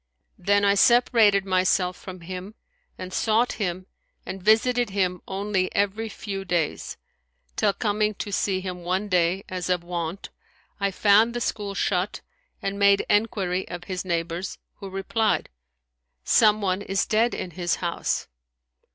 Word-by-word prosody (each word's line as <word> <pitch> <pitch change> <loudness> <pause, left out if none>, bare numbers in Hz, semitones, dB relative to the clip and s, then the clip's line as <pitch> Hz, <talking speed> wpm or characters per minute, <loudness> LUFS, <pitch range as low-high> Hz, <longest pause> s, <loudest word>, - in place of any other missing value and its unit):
Then 205 +2 +2
I 200 - +5
separated 215 -2 +4
myself 185 -1 +2
from 185 -1 -10
him 185 +4 -7 0.4
and 185 0 -7
sought 225 +2 +2
him 185 -1 -2 0.4
and 190 0 -6
visited 230 +4 +3
him 185 -2 -1
only 195 -1 -1
every 205 +3 0
few 195 -2 -5
days, 170 -4 -2 0.6
till 205 -2 +2
coming 210 +1 0
to 205 - -5
see 190 -1 0
him 180 -2 -6
one 190 +4 -1
day 180 +1 +2
as 185 -1 -4
of 180 -1 +1
wont, 175 +1 -5 0.5
I 200 -1 +1
found 215 +4 +4
the - - -1
school 205 -4 -3
shut 190 0 -1 0.4
and 195 +1 -2
made 200 0 +4
enquiry 195 -4 +1
of 175 0 -7
his 180 -1 -4
neighbors, 170 +1 -3 0.2
who 200 -2 -8
replied, 195 +3 0 0.7
Some 215 - +4
one 190 -1 0
is 195 -1 0
dead 225 +3 +2
in 180 - -5
his 175 0 -1
house.' 170 -1 -2
195 Hz, 145 wpm, -25 LUFS, 180-210 Hz, 0.7 s, I